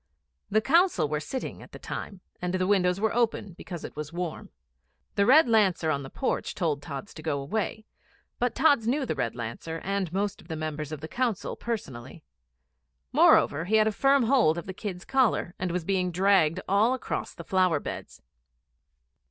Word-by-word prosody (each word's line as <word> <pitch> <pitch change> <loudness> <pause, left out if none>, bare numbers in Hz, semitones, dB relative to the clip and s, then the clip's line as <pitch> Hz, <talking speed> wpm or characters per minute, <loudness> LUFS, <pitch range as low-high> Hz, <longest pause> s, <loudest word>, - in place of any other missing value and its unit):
The 215 +2 +3
Council 310 - +3
were 150 0 -1
sitting 260 - -5
at - - -14
the - - -7
time, 195 -3 -7 0.2
and 180 +1 -1
the 185 0 +1
windows 185 -2 +2
were 220 0 +1
open 225 -5 0
because 175 -1 -8
it - - -8
was 150 0 -6
warm. 175 -1 -5 0.6
The 200 +1 +2
Red 285 +3 +7
Lancer 195 -8 +3
in 140 -2 -1
the 135 - -8
porch 265 - -2
told 155 -6 -1
Tods 140 +5 -7
to 155 - -10
go 150 -3 -1
away; 215 +8 -3 0.5
but 245 -1 0
Tods 285 -8 +3
knew 270 +3 +1
the 225 - -1
Red 125 -6 -2
Lancer 120 +8 -5
and 195 -3 -1
most 200 +2 -2
of - - -19
the 160 - -4
Members 155 -1 -4
of 155 -2 -6
Council 235 -1 -2
personally. 155 - -6 0.9
Moreover, 155 +3 +4
he 210 +4 +1
had 215 0 +4
firm 275 +4 +3
hold 230 - +3
of 170 - -5
the 190 - -6
kid's 185 -2 -6
collar, 255 -9 +1
and 185 - -1
was 175 -1 -2
being 185 -1 +1
dragged 185 -2 +3
all 215 +6 +3
across 260 - -4
the 170 - -8
flower 185 -4 +2
beds. - - -8
185 Hz, 185 wpm, -27 LUFS, 160-220 Hz, 0.9 s, Red